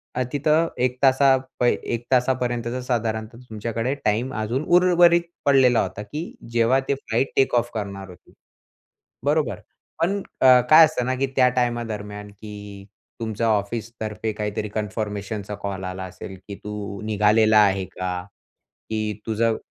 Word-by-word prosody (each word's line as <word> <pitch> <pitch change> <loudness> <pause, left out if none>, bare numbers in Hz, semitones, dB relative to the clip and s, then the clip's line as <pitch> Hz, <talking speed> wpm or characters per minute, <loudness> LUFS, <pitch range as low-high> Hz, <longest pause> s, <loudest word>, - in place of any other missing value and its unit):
अ, 125 - 0
तिथं 155 +3 +2 0.2
1 125 0 0
तासा 135 0 +5 0.2
पहि 120 -1 +3 0.2
1 120 0 -3
तासापर्यंतचा 125 -1 0
साधारणतः 115 -2 -2
तुमच्याकडे 115 +4 -2
टाईम 115 +5 0
अजून 115 +6 -2
उर्वरित 175 -1 +5 0.2
पडलेला 130 -4 +5
होता, 105 - -4
की 150 - -6 0.2
जेव्हा 120 +3 +3
ते 140 - +1
फ्लाइट 135 -1 -2
टेक 135 -2 +3
ऑफ 120 0 +1
करणार 100 -3 -5
होते. 90 - -16 0.9
बरोबर. - - +1 0.4
पण 195 +4 +1 0.2
अ, 130 -1 +8
काय 160 +1 +9
असतं 125 -5 -2
ना, 130 - 0
की 135 +1 0
त्या 130 -1 +5
टाईमादरम्यान, 110 -4 -2
की 105 -1 -10 0.3
तुमच्या 115 0 -2
ऑफिसतर्फे 110 +1 -2
काहीतरी 105 0 -3
कन्फर्मेशनचा 105 -1 -4
कॉल 100 -2 -5
आला 95 0 -5
असेल, 95 +1 -9
की 100 - -6
"तू 105 -1 -6
निघालेला 110 +1 +4
आहे 95 -2 +3
का? 90 -1 -4 0.7
की 110 -1 -1
तुझं 115 0 +1
115 Hz, 140 wpm, -23 LUFS, 105-125 Hz, 0.9 s, काय